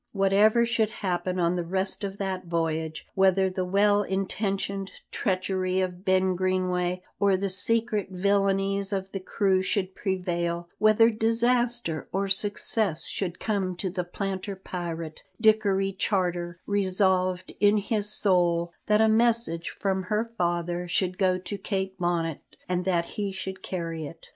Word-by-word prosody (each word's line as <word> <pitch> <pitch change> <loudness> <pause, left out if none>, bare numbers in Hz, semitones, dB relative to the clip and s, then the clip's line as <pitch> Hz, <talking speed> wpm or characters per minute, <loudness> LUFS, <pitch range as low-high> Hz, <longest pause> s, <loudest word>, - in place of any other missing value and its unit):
Whatever 205 +4 +4
should 230 -2 +1
happen 185 -2 -2
on 170 0 +2
the 175 - -1
rest 190 +4 -2
of 195 0 -4
that 190 -2 -3
voyage; 160 -2 -2
whether 190 0 +3
the 185 0 -2
well 205 +2 +3
intentioned 195 0 -2 0.2
treachery 185 -1 0
of 185 -1 -2
Ben 190 0 +2
Greenway, 180 -1 0 0.2
or 200 -2 +3
the 195 0 -2
secret 220 +2 +1
villainies 195 +1 +1
of 195 -1 -3
the 195 - -3
crew, 190 0 +1
should 190 0 -1
prevail; 175 -3 -2
whether 215 +2 +5
disaster 230 -5 +1
or 195 +1 0
success 200 -3 +1
should 180 -3 -4
come 195 -4 -1
to 185 +1 -2
the 180 0 -2
planter 195 +2 -4
pirate, 170 -4 -6 0.2
Dickory 205 -3 +3
Charter 180 -3 -1
resolved 185 -2 +1
in 205 +1 +5
his 210 0 -1
soul 175 -4 +2
that 210 +1 +4
a 220 - +5
message 220 -7 +2
from 190 -2 -1
her 215 +4 -1
father 175 -1 -1
should 185 +1 0
go 185 -2 +3
to 195 +2 -6
Kate 190 -1 -2
Bonnet, 170 -3 0 0.3
and 180 0 -1
that 175 -3 +1
he 205 +1 -4
should 190 0 -6
carry 165 -4 -4
it. 165 +3 -13
190 Hz, 145 wpm, -27 LUFS, 180-200 Hz, 0.3 s, whether